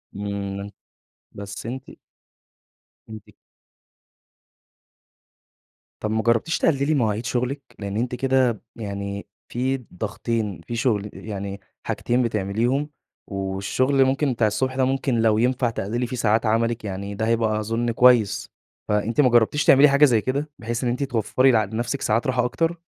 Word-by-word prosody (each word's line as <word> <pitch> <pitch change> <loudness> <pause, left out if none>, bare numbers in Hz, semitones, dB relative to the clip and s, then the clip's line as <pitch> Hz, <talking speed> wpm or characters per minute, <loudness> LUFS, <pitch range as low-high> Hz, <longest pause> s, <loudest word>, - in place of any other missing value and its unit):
امم. 100 0 -4 0.6
بس 100 0 -8
أنتِ 130 +3 -5 1.3
أنتِ 110 -1 -8 2.8
طب 110 - -2
ما 110 0 +1
جربتيش 115 +8 +2
تقلّلي 140 0 +2
مواعيد 115 -5 0
شغلِك؟ 125 +4 -1 0.2
لأن 100 0 -4
أنتِ 125 +1 -1
كده 130 -3 +1
يعني 100 -2 -5 0.2
في 130 +2 0 0.2
ضغطين 105 -1 -3
في 120 - -4
شغل 110 -4 0
يعني 100 -2 -6 0.2
حاجتين 125 +1 0
بتعمليهم، 115 +7 0 0.4
والشغل 100 +8 +1
ممكن 135 0 +1
بتاع 115 -2 +2
الصبح 130 +5 -1
ده، 130 - +2
ممكن 135 -1 0
لو 110 -1 +3
ينفع 125 +1 +2
تقلّلي 115 +3 -2
في 125 - -5
ساعات 110 -1 +2
عملِك، 115 +1 +1
يعني 100 +1 -5
ده 110 +2 -1
هيبقى 110 -2 +1
أظن 115 +2 -1
كويس. 120 -3 +4 0.4
فأنتِ 105 +6 +1
ما 130 - +4
جربتيش 120 +5 +3
تعملي 140 +2 +7
حاجة 140 +2 +6
زي 115 -6 +3
كده، 140 +5 -2
بحيث 120 +2 -3
إن 125 - +1
أنتِ 125 +4 -1
توفري 130 +1 +2
لنفسِك 115 +4 0
ساعات 110 +4 +1
راحة 125 -2 +1
أكتر؟ 165 +6 -1
115 Hz, 140 wpm, -23 LUFS, 105-130 Hz, 2.8 s, تعملي